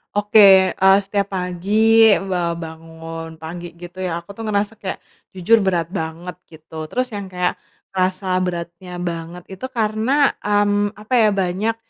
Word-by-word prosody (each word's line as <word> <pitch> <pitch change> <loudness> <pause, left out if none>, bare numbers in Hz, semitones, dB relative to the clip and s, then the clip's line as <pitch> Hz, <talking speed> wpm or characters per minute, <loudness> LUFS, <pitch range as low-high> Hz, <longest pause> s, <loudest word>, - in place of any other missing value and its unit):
Oke, 200 -2 +6
eee, 190 0 +5
setiap 200 -1 -2
pagi 215 +5 +3
ba 175 -3 -2
bangun 165 0 -9
pagi 170 +1 -8
gitu 175 +2 -9
ya, 175 -3 -2
aku 170 +4 -10
tuh 225 - -10
ngerasa 210 -1 -1
kayak 190 - -4 0.4
jujur 225 +5 +4
berat 180 -4 +1
banget 165 +1 -5 0.2
gitu, 160 0 -9
terus 255 +2 -2
yang 200 -2 -5
kayak 180 -1 -1 0.4
ngerasa 185 0 -1
beratnya 175 0 -5
banget 170 0 -5
itu 190 +7 -7
karena, 230 +5 +1
mmm, 205 0 +1
apa 210 +4 -7
ya, 225 -4 +5
banyak 200 +3 -1
185 Hz, 145 wpm, -20 LUFS, 170-205 Hz, 0.4 s, Oke